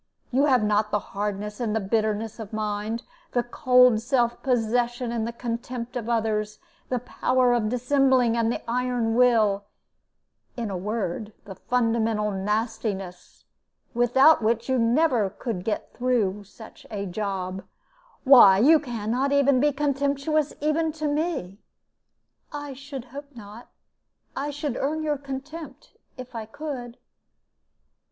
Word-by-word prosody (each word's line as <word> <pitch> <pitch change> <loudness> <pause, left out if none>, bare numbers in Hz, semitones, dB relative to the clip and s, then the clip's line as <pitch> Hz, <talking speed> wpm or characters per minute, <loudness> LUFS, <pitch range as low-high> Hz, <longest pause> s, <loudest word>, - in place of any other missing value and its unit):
You 270 +3 +3
have 255 -6 +3
not 210 0 +1
the 210 - +1 0.2
hardness 205 +1 -3
and 220 -3 -1
bitterness 220 +1 -1
of 215 -3 -7
mind, 215 +1 -3 0.3
the 245 - +2
cold 250 -1 +4
self 240 -1 0
possession 240 -1 0
and 235 0 -3
contempt 240 +1 -5
of 235 -2 -4
others, 215 -2 -1 0.3
the 250 - 0
power 250 +1 +1
of 225 -3 +1
dissembling 250 -1 +2
and 230 -1 +1
the - - -4
iron 245 -1 0
will 220 -5 +3 0.9
in 230 -4 -3
a - - -3
word, 210 +1 -3
the 195 - -8
fundamental 225 -1 0
nastiness, 205 -2 -3 0.5
without 245 +6 +5
which 230 +1 0
you 260 -1 +1
never 235 -2 +2
could 195 -2 -5
get 215 - -3
through 215 -6 0
such 220 +3 -14
a 200 -2 -4
job. 190 -1 -4 0.6
Why, 245 -8 +8
you 300 +9 +6
can 235 -6 -4
not 265 +4 +1
be 280 0 +3
contemptuous 285 +1 0
even 310 +2 +1
to 310 -1 -3
me!" 290 - -2 0.9
"I 290 -1 -6
should 270 -1 -8
hope 285 -1 -9
not. 220 +1 -11 0.7
I 285 +2 -2
should 290 -3 -3
earn 310 +3 -1
your 300 -2 -1
contempt, 280 +1 -8 0.3
if 255 0 -9
I 225 -2 -6
could." 245 -2 -7
240 Hz, 130 wpm, -25 LUFS, 215-270 Hz, 0.9 s, Why